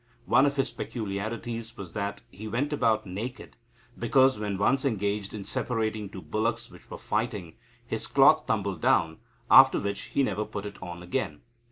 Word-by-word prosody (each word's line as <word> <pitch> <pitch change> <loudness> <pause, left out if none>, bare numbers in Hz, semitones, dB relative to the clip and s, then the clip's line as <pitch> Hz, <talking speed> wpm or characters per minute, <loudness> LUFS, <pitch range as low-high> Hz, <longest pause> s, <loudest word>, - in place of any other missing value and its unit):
One 135 +2 +5
of 140 - -1
his 135 - 0
peculiarities 115 +2 -5
was 95 -4 -8
that 100 -1 -3
he 110 +3 -8
went 130 +7 -1
about 110 -6 +2
naked, 110 +7 -6 0.4
because, 130 +1 +4
when 105 -2 -2
once 130 +7 +2
engaged 105 -5 -1
in 105 -3 -7
separating 110 -2 -2
two 95 -2 -9
bullocks 115 +2 -2
which 90 - -16
were - - -7
fighting, - - -2 0.3
his - - -3
cloth - - +5
tumbled - - -1
down, 80 -1 +2 0.3
after 135 0 +8
which 100 0 -3
he 140 - +5
never 105 -3 -1
put 100 -1 -6
it 100 -1 -8
on 90 -1 -7
again. 90 - -3
110 Hz, 170 wpm, -28 LUFS, 100-120 Hz, 0.4 s, after